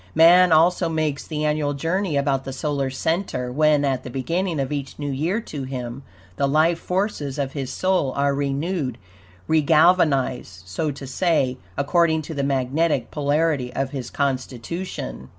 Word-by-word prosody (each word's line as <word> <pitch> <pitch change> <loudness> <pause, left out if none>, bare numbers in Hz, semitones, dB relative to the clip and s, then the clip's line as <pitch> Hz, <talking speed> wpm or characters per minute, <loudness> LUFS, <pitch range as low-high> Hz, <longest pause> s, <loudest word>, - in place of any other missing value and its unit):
Man 175 +2 +7
also 170 +2 +4
makes 155 -3 -2
the 155 -1 -2
annual 150 -1 0
journey 165 +2 -1
about 140 -1 +1
the 135 - -6
solar 140 0 -1
center, 135 -2 -2
when, 150 +1 +3
at 130 -2 -1
the - - -7
beginning 165 +6 -2
of 135 0 -2
each 140 -2 -4
new 145 -1 -3
year 165 +10 0
to 150 -9 -7
him, 130 -1 -5 0.4
the 140 - +2
life 160 +4 +3
forces 180 -8 -2
of 140 -2 -2
his 135 -3 -4
soul 185 -4 +1
are 140 0 +1
renewed, 140 -1 -2 0.5
regalvanized, 150 - +3
so 150 - -2
to 140 -1 -6
say, 135 -2 0 0.2
according 160 +2 +2
to 160 - -7
the 140 - -2
magnetic 140 +1 0
polarity 145 -3 0
of 135 0 -1
his 135 -3 -5
constitution. 130 - -4
145 Hz, 155 wpm, -23 LUFS, 135-165 Hz, 0.5 s, Man